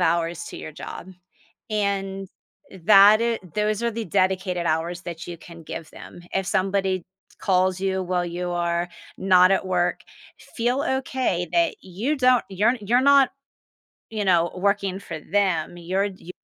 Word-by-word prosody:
hours 170 0 0
to - - -8
your 155 - -8
job. 165 - -8 0.6
And, 195 -2 -2 0.6
that 210 +1 +8
i 235 0 +1 0.2
those 210 +1 0
are 235 - +1
the 230 0 -4
dedicated 185 -1 0
hours 165 +2 -1
that 170 -1 -7
you 175 - -6
can 170 0 -13
give 165 0 -7
them. 175 - -12
If 190 -1 -1
somebody 190 -2 0 0.4
calls 185 -1 +2
you 190 -1 0
while 180 -1 -1
you 175 +1 -4
are 170 0 -1 0.3
not 185 -1 +5
at 190 - +1
work, 180 -1 0 0.5
feel 245 +4 +1 0.2
okay 255 -10 -2
that 335 -2 +3
you 205 - -2
don't 255 -2 +4
you're 210 +6 +2
you're 230 +5 +2
not, 280 -1 +5 0.8
you 215 -2 -2
know, 175 -2 +3
working 195 0 0
for 165 -4 -7
them. 180 -2 0
You're 180 +3 -1
you're 185 -3 -8
190 Hz, 155 wpm, -24 LUFS, 175-210 Hz, 0.8 s, that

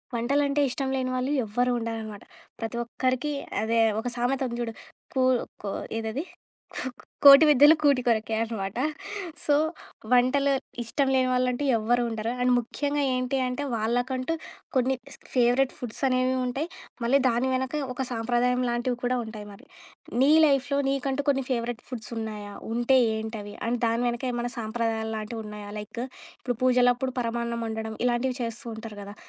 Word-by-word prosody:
వంటలంటే 280 +4 +1
ఇష్టం 265 +1 -2
లేని 255 -1 -1
వాళ్ళు 255 +2 -1
ఎవ్వరూ 245 +4 +1
ఉండరనమాట. 225 -2 -5 0.4
ప్రతి 225 +1 -3
ఒక్కరికి 255 +4 -1 0.3
అదే 230 +1 +1 0.2
ఒక 245 - -4
సామెత 250 +3 0
ఉంది 235 0 -5
జూడు. 230 -1 -3 0.4
కూ 260 - +2 0.4
కో 200 - -2 0.3
ఏదది. 225 +6 -3 0.5
కూ - - -3 0.4
'కోటి 280 +2 +11
విద్యలు 295 +2 +8
కూటి 280 -4 +4
కొరకే 225 -1 +1
అనమాట.' 215 -3 -4 0.7
సో, 290 - +3 0.6
వంటలు 255 +3 +4 0.3
ఇష్టం 270 +4 0
లేని 255 -1 +3
వాళ్ళంటూ 250 +1 +1
ఎవ్వరు 240 +3 +2
ఉండరు. 225 0 -2
అండ్ 250 0 +3
ముఖ్యంగా 285 +4 -2
ఏంటి 255 +1 0
అంటే 250 +3 -3
వాళ్ళకంటూ 245 +6 0 0.4
కొన్ని 260 +1 +3 0.2
స్క్ - - -20
ఫేవరెట్ 250 +2 +3
ఫుడ్స్ 240 -3 -6
అనేవి 255 0 +2
ఉంటాయి. 270 +6 -2 0.4
మళ్ళీ 245 +4 +4
దాని 240 +3 +1
వెనక 260 +1 -1 0.2
ఒక 265 - -2
సాంప్రదాయం 245 +2 +1
లాంటివి 240 +1 -1
కూడా 250 +1 +1
ఉంటాయి 220 -2 -8
మరి. 200 - -15 0.6
నీ 280 +3 +6
లైఫ్‌లో 280 -1 +2
నీకంటూ 275 +1 -1
కొన్ని 270 -1 +2
ఫేవరెట్ 235 -2 -2
ఫుడ్స్ 235 -4 -6
ఉన్నాయా? 210 -2 -5 0.2
ఉంటే 240 +3 +3 0.2
ఏంటవి? 220 -2 -5
అండ్ 240 0 0
దాని 230 +1 +1
వెనక 240 +1 -2
ఏమన్నా 240 0 -2
సాంప్రదాయాలు 220 0 -2
లాంటివున్నాయా? 210 -1 -6
లైక్, 210 +3 -6 0.4
ఇప్పుడు 245 -3 -3
పూజలప్పుడు 250 0 +3
పరమాన్నం 235 0 -2
ఒండడం 220 0 -4
ఇలాంటివి 250 +1 +1
చేస్తూ 230 0 -5
ఉంటారు 220 -2 -8
గదా! 200 +1 -9
245 Hz, 150 wpm, -27 LUFS, 225-260 Hz, 0.7 s, కోటి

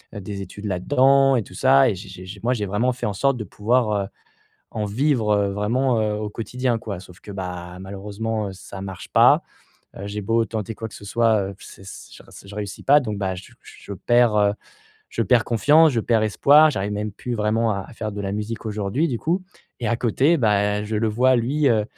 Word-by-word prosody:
heu, - - -5
des 100 +1 -6
études 100 +2 -9
là-dedans 135 +8 +3
et 110 - -1
tout - - -15
ça 135 +6 +4
et - - 0
j'ai 95 +2 -10
j'ai 95 -1 -10
j'ai 100 +2 -9
moi, 125 - +2
j'ai 105 -5 -2
vraiment 105 +6 0
fait 125 - -5
en 105 - -1
sorte 135 +5 +1
de 110 - -4
pouvoir, 115 +2 0
heu, - - -9 0.6
en 105 -1 -3
vivre, 115 0 +1
heu, 100 -1 +1
vraiment, 115 +4 0
heu, 105 -1 0
au 105 0 -4
quotidien, 120 +3 -2
quoi, 100 -5 -6
sauf 90 -2 -15
que, 105 - -11
bah, 90 -2 -6
malheureusement, 105 +3 -4
heu, - - -8
ça 95 +1 -10
marche 95 -2 -8
pas, - - +5 0.5
heu, 100 - -7
j'ai 105 +1 -4
beau 115 +3 +1
tenter 110 -1 -5
quoi 110 - -6
que - - -15
ce 100 - -11
soit, 110 -2 +2
heu, 100 - -10
c - - -13
c 95 - -11
je - - -13
re - - -24 0.2
je 100 - -10
réussis 105 -1 -6
pas 145 +2 +6
donc, 105 -6 -4
bah, 95 -2 -2
je 90 - -12
je 100 - -11
perds, 120 +2 +3
heu, 100 -1 +3 0.6
je - - -1
perds 120 -3 +3
confiance, 150 +8 +4
je 115 - +1
perds 115 0 +1
espoir. 145 +8 +5
J'arrive 100 -5 -3
même 105 +1 -3
plus 120 +4 -5
vraiment 110 +1 +1
à 100 - -2
à - - -12
faire 110 -2 -4
de 100 - -5
la 100 -1 -3
musique 105 +3 -4
aujourd'hui, 110 +9 -1
du 120 -5 -2
coup 175 +4 -1 0.4
et 115 - -1
à 115 - +1
côté, 130 +8 +2
bah, 105 -3 +1
je 110 +1 -4
le 110 +1 +1
vois, 125 +4 +3
lui, 140 +6 0
heu, 110 -3 +2
110 Hz, 235 wpm, -22 LUFS, 100-120 Hz, 0.6 s, pas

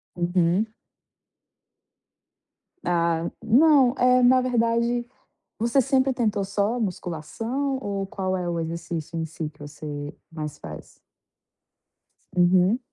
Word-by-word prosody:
Uhum. 175 +3 +2 2.2
Ah, 170 -1 +1
não 265 +2 +5
é, 250 0 +4
na 255 +1 +6
verdade, 235 -1 +1 0.5
você 235 +4 +3
sempre 265 0 +2
tentou 215 -5 0
só 205 +5 0
musculação 225 - -3
ou 200 -2 -2
qual 190 -1 -2
é 180 - -3
o 170 -1 -1
exercício 165 0 -4
em 160 - -1
si 160 -1 -5
que 150 - -26
você 145 0 -7 0.2
mais 155 -2 -6
faz? 75 -2 -9 1.4
Uhum. 180 +5 +4
195 Hz, 105 wpm, -25 LUFS, 170-245 Hz, 2.2 s, na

